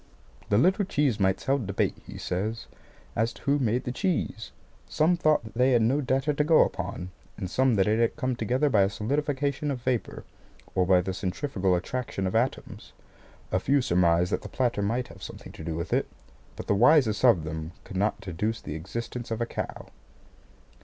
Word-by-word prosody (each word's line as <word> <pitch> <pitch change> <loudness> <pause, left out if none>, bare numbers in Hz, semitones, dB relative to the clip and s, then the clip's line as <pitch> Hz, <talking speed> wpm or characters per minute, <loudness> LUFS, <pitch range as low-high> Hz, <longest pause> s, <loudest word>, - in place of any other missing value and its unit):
"The 100 - +3
little 190 - +3
cheese 145 - 0
mites 95 -1 +1
held 135 -6 +1
debate," 100 - 0
he - - -8
says, 110 +5 -3 0.5
"as 115 +2 +1
to - - -16
who 140 +1 +2
made 120 -1 +1
the 125 - -3
cheese. 155 - -2 0.4
Some 165 +4 +3
thought 155 -6 +2
that 110 - -11
they 125 +2 +3
had 120 -2 +4
no 135 +6 +2
data 135 +3 +1
to 150 - +1
go 155 +1 +6
upon, 90 -1 -5 0.3
and 95 - -4
some 130 +5 +2
that 95 -1 +3
it 110 +2 +2
had 115 -1 +2
come 130 -4 -1
together 125 +6 +1
by 110 -8 +4
a 95 - +3
solidification 140 +6 -1
of 130 -4 -3
vapour, 125 -3 -2 0.5
or 90 -2 +1
by 90 -1 +5
the 95 +1 -3
centrifugal 95 0 -1
attraction 100 +1 -3
of 95 - -2
atoms. 120 +4 -2 0.6
A 90 - +2
few 140 +8 +2
surmised 90 -5 +2
that - - 0
the - - -8
platter 120 -5 0
might 115 +5 -1
have - - -13
something - - -9
to - - -10
do 80 -1 -3
with 85 - -3
it; - - +1 0.5
but - - -7
the - - +2
wisest 120 0 +4
of 115 -11 +5
them 80 +1 -5
could 95 - -10
not 105 +2 0
deduce 100 +5 -2
the 75 - -7
existence 115 +9 -5
of 115 0 -2
a 120 - 0
cow." - - -5
115 Hz, 200 wpm, -27 LUFS, 95-135 Hz, 0.6 s, go